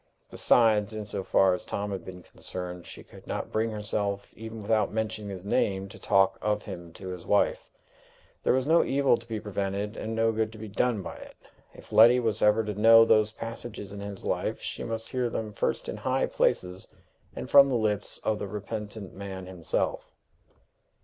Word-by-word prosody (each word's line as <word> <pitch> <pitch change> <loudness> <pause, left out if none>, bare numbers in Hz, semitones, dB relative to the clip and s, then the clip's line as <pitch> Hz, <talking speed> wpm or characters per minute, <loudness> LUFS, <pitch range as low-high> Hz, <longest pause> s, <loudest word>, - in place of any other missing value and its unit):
Besides, 110 -2 +3
in 110 -1 -5
so 100 - -3
far 95 0 +3
as 90 - -4
Tom 100 0 -3
had 95 -3 -4
been 90 -1 -10
concerned, 90 -1 -7
she - - -9
could - - -16
not - - -4
bring 110 +1 0
herself, 105 -2 -2
even 110 0 -8
without 110 +1 +1
mentioning 110 -1 -3
his 95 -1 -7
name, 100 -1 0
to - - -12
talk 95 0 +3
of 105 0 0
him 85 -1 -8
to 95 +1 -8
his 90 -2 -6
wife: - - +1 0.7
there - - +2
was 130 0 +2
no 165 +3 +5
evil 140 -2 +3
to 115 0 -11
be 110 -2 -3
prevented 100 0 -3
and 110 +1 -4
no 115 0 +3
good 110 0 -1
to - - -11
be 110 0 -7
done 105 0 0
by - - -7
it. - - -12 0.4
If - - -14
Letty 120 +3 +7
was 110 -3 -1
ever 105 +1 +4
to 105 -1 -3
know 115 +2 +7
those 110 -1 +4
passages 115 -3 -7
in 100 - -7
his 100 -1 -7
life, - - -1
she - - -5
must 115 0 -5
hear 125 -2 0
them 110 -2 -4
first - - -1
in - - -4
high - - 0
places, 90 +1 0 0.5
and - - -5
from 140 -1 +7
the 130 - +1
lips 105 -3 -1
of 110 -1 0
the 100 - -4
repentant 105 0 -6
man 95 -1 -7
himself! 90 -4 -2
105 Hz, 195 wpm, -28 LUFS, 100-115 Hz, 0.7 s, Letty